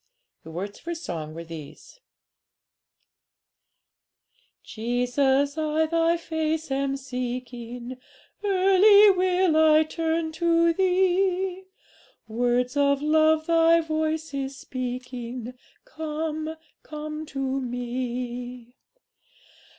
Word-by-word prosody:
The 160 - -12
words 190 +5 -6
of - - -24
her 340 0 -3
song 160 - -6
were 165 - -6
these: 165 - -11 2.6
'Jesus, 265 +5 0
I 310 +1 +1
Thy 330 +1 +2
face 320 -2 -2
am 275 0 0
seeking, 250 -1 -6 0.5
Early 400 +1 +6
will 365 -2 +2
I 315 0 +6
turn 320 0 -2
to 335 0 +2
Thee; 375 0 +1 0.6
Words 245 +3 0
of 280 0 +2
love 315 +1 +3
Thy 330 0 +4
voice 315 -1 -2
is 270 -1 -4
speaking: 250 -1 -6 0.3
"Come, 315 -5 -4 0.3
come 305 0 -7
to 270 -1 -2
Me. 245 0 -5
300 Hz, 90 wpm, -25 LUFS, 250-330 Hz, 2.6 s, Early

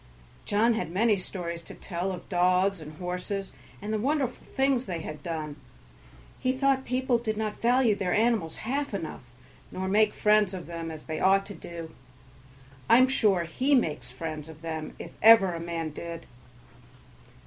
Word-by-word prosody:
John 225 +3 +3
had 220 -6 -2
many 210 +5 +3
stories 175 -3 -5
to - - -11
tell 180 +1 -3
of 180 -2 -7
dogs 185 0 +2
and 155 0 -9
horses, 180 +3 -4 0.3
and 215 +1 -3
the 215 - 0
wonderful 270 +1 -1
things 265 -2 0
they 170 -3 -3
had 155 -2 -7
done; 155 -2 -4 0.8
he 255 -1 +1
thought 265 0 +1
people 255 -1 +1
did 220 -2 -2
not 215 -1 -3
value 245 -1 +4
their 195 -3 -2
animals 215 -7 +2
half 275 -1 -1
enough 165 -5 -5 0.5
nor 190 0 -3
make 210 +2 +3
friends 210 -2 +3
of 180 - -7
them 165 -1 -5
as 155 -1 -8
they 160 -1 -4
ought 195 +1 +4
to 205 - -8
do. 170 -3 -8 1.0
I 230 - +8
am 255 +1 +6
sure 205 -9 +3
he 260 +12 +1
makes 150 - 0
friends 155 +3 -6
of 160 0 -13
them 160 -1 -5
if - - -8
ever 220 -5 +8
a 170 - -4
man 165 -1 -3
did. 170 +2 -7
190 Hz, 170 wpm, -28 LUFS, 165-230 Hz, 1.0 s, I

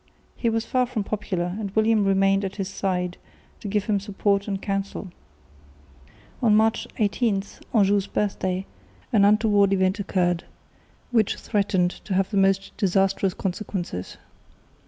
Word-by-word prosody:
He 235 - 0
was 225 0 -1
far 250 +1 +1
from 235 -4 -2
popular, 185 -4 -3
and 205 -2 -3
William 220 -1 +3
remained 195 0 +3
at 195 - -4
his 195 -2 -3
side 180 -2 -2 0.4
to - - -7
give 205 0 0
him 205 -2 +1
support 200 0 0
and 195 -2 -2
counsel. 195 -1 -3 1.3
On 220 -4 +4
March 220 +1 +2
18 205 -1 +1 0.3
(Anjou's 200 -3 +3
birthday) 190 -2 -1 0.5
an 200 -2 +5
untoward 205 -1 +4
event 190 +1 +1
occurred, 175 -3 0 0.7
which 225 -4 +2
threatened 190 -3 0
to 195 - -2
have 195 +2 0
most 195 0 +2
disastrous 195 0 +1
consequences. 185 - -4
195 Hz, 135 wpm, -24 LUFS, 190-210 Hz, 1.3 s, an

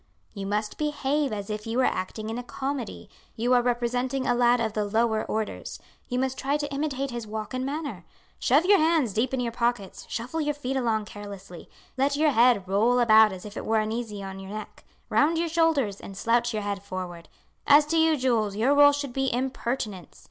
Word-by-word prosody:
"You 200 -2 -5
must 210 +1 -2
behave 295 -1 0
as 205 -1 -4
if 210 +1 -5
you 225 +2 -2
were 260 - +3
acting 215 +4 -3
in 230 - -3
a - - -6
comedy. 265 -2 -5 0.3
You 240 +3 +1
are 245 - +5
representing 245 +2 -1
a 245 - +2
lad 240 0 +3
of 220 -2 -1
the 215 - 0
lower 220 +1 +1
orders. 220 -1 -4 0.3
You 250 - -2
must 265 0 -1
try 280 +2 0
to 290 -1 -4
imitate 275 -2 -2
his 235 -2 -5
walk 215 +2 -5
and 255 0 -2
manner. 275 - -4 0.4
Shove 290 +7 +3
your 400 +1 +6
hands 315 - +2
deep 235 +5 0
in 265 - -1
your 240 -1 -1
pockets, 235 -4 -2
shuffle 255 +8 -3
your 295 -1 -1
feet 270 -2 -4
along 225 -5 0
carelessly; 200 -4 -10 0.3
let 280 +2 +2
your 305 0 +3
head 235 -6 +4
roll 220 +6 +3
about 220 -3 +6
as 185 0 -8
if 210 +1 -9
it - - -5
were 220 0 +1
uneasy 215 -1 -3
on 195 0 -7
your 195 0 -9
neck, 215 +1 -8 0.3
round 315 +3 +3
your 335 0 0
shoulders, 310 -11 +1
and 195 - -9
slouch 235 +3 +1
your 215 -2 -3
head 200 -1 -3
forward. 185 -3 -7 0.4
As 290 +1 +7
to 325 +2 0
you 320 -1 +4
Jules, 230 -6 +1
your 240 +7 +3
role 285 0 +7
should 285 -3 -4
be 270 0 0
impertinence. 240 - -3
240 Hz, 210 wpm, -26 LUFS, 215-275 Hz, 0.4 s, As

